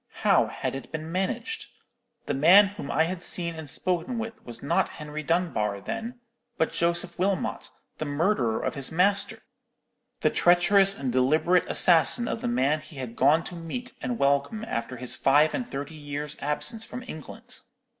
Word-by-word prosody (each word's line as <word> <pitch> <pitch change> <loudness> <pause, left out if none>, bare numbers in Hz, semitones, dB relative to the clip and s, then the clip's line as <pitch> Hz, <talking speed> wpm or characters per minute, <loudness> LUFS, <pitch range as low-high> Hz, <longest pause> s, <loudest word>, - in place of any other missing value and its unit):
How - - +4
had - - -4
it 135 -2 -8
been 160 0 -6
managed? 195 - -3 0.6
The - - -2
man 180 +9 +6
whom 195 -8 -8
I 160 - +2
had 175 +2 -3
seen 170 -1 0
and 160 -3 -8
spoken 180 - -2
with 225 0 -6
was 120 -1 -9
not 140 - +1
Henry 150 0 -6
Dunbar, 155 - -1
then, 230 - -6 0.4
but 160 - +1
Joseph 170 +1 -1
Wilmot, 190 -3 -1 0.3
the 155 - -2
murderer 145 - 0
of - - -1
his 140 -1 -2
master—the 195 +4 -3
treacherous 195 +3 +4
and 135 -6 -3
deliberate 155 +8 +2
assassin 180 +8 +6
of - - -3
the - - -2
man 135 +6 +1
he 155 0 -14
had 125 -4 -6
gone 150 +5 +3
to 175 - -6
meet 175 +10 -6
and 245 -2 -3
welcome 140 +10 0
after 115 - -4
his 125 0 0
five 145 +3 +3
and 245 -1 -3
thirty 145 - -6
years' 145 -1 -6
absence 215 - -2
from 250 - -7
England! 230 - -10
160 Hz, 165 wpm, -26 LUFS, 140-195 Hz, 0.6 s, man